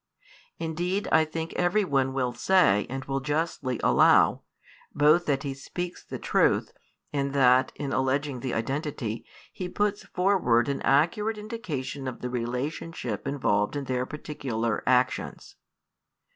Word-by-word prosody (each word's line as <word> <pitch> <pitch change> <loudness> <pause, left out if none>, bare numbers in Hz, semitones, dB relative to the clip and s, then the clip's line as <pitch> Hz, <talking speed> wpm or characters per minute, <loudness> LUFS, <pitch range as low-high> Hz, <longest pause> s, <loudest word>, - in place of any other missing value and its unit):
Indeed 175 +5 -2
I 160 0 +5
think 160 +1 -5
every 180 +4 +2
one 135 -4 +1
will 130 -2 -1
say 120 - +3
and 135 +1 -5
will 135 0 -1
justly 145 -3 -2
allow, - - +5 0.5
both 155 +4 +4
that 135 -2 +1
he 140 -2 -3
speaks 175 +6 -6
the - - -6
truth - - +1 0.4
and 140 -1 -1
that 130 -1 +4
(in 140 -2 -4
alleging 135 0 0
the 125 0 -3
identity) 125 -2 -3 0.3
he 180 -1 -5
puts 205 +2 0
forward 180 -11 +2
an 140 - -2
accurate 190 +10 +2
indication 160 - -5
of 130 - -6
the 125 - -4
relationship 125 0 -3
involved 105 -6 0
in 145 - -2
their 130 -1 -2
particular 120 -7 -3
actions. 130 0 0
140 Hz, 135 wpm, -27 LUFS, 130-165 Hz, 0.5 s, I